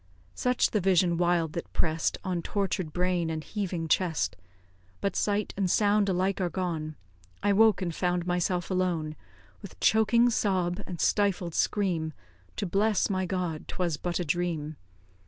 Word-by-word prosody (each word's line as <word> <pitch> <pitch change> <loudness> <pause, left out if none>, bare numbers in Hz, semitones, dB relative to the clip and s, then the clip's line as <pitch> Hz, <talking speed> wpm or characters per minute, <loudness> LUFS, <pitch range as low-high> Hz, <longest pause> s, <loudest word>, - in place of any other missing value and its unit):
Such 250 0 +1
the 210 - +1
vision 180 -2 +3
wild 170 -2 +1
that 170 - -5
press'd 160 0 0
On 180 -2 -1
tortur'd 190 -4 -2
brain 180 -1 0
and 160 -1 -3
heaving 180 -5 -3
chest; 165 -1 +1 0.6
But 200 - -1
sight 205 0 0
and 190 -2 0
sound 205 +1 +3
alike 190 +1 0
are 180 - +1
gone, 165 -4 -3 0.5
I 205 - +3
woke, 220 -1 +4
and 170 -2 -2
found 180 0 0
myself 175 0 -1
alone; 175 -4 0 0.5
With - - -11
choking 235 +2 +4
sob 185 -5 0
and 175 -3 -6
stifled 195 -5 +1
scream 170 -7 0 0.4
To - - -2
bless 205 +2 +1
my 185 -1 0
God 180 -5 -3
'twas 175 -4 -1
but 175 +3 -2
a 175 - -1
dream! 160 -1 -2
180 Hz, 155 wpm, -28 LUFS, 170-195 Hz, 0.6 s, woke